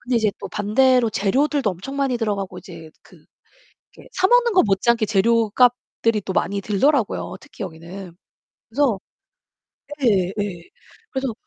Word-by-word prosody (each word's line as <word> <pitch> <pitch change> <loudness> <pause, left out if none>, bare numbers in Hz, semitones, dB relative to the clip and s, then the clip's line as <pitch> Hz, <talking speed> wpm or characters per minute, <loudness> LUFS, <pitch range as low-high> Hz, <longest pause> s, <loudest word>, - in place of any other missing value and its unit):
근데 250 -1 -1
이제 220 -3 +2
또 - - -7
반대로 235 +3 +2
재료들도 265 +5 +1
엄청 195 +11 -7
많이 270 -3 0
들어가고 200 -5 -3
이제 165 -3 -11
그 - - -20 0.7
이렇게 - - -16
사 375 - +2
먹는 485 -1 +4
것 370 - +5
못지않게 215 +3 +2
재료값들이 230 +1 +2
또 190 - -4
많이 200 +3 0
들더라고요, 225 +4 0
특히 - - -11
여기는. 175 +2 -9 0.5
그래서 240 -4 +1 1.1
예 - - +4
예 190 -4 +2
예. 175 -5 -6 0.5
그래서 265 -3 -2
220 Hz, 320 characters per minute, -21 LUFS, 195-255 Hz, 1.1 s, 것